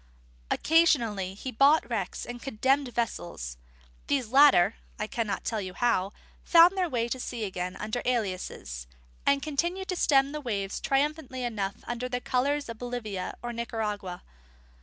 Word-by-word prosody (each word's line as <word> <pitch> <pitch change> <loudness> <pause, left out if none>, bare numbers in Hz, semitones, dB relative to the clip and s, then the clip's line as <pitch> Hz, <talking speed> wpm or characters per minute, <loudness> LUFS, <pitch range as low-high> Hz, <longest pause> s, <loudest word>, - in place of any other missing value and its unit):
Occasionally 235 - +2
he 255 +6 -5
bought 275 +2 +4
wrecks 215 -6 -3
and 240 0 -7
condemned 270 +1 +1
vessels; 175 - -3 0.5
these 265 -6 0
latter 250 -7 +6 0.2
(I 210 - -2
cannot 215 -3 -2
tell 220 -2 -1
you 185 -1 -6
how) 200 -5 +1 0.3
found 340 +2 +7
their 365 -2 0
way 235 -4 0
to 255 +2 -3
sea 240 -2 -4
again 185 -2 -3
under 215 +3 -3
aliases, 185 - -2 0.4
and 280 0 +3
continued 345 +6 -1
to 365 - 0
stem 275 -4 +3
the 300 0 -4
waves 200 -7 -2
triumphantly 275 -2 0
enough 215 -3 -3
under 240 +1 -4
the 250 0 -1
colours 280 +4 0
of 230 -1 -7
Bolivia 235 -6 -4
or 240 0 -3
Nicaragua. 210 -6 -4
240 Hz, 150 wpm, -28 LUFS, 205-275 Hz, 0.5 s, found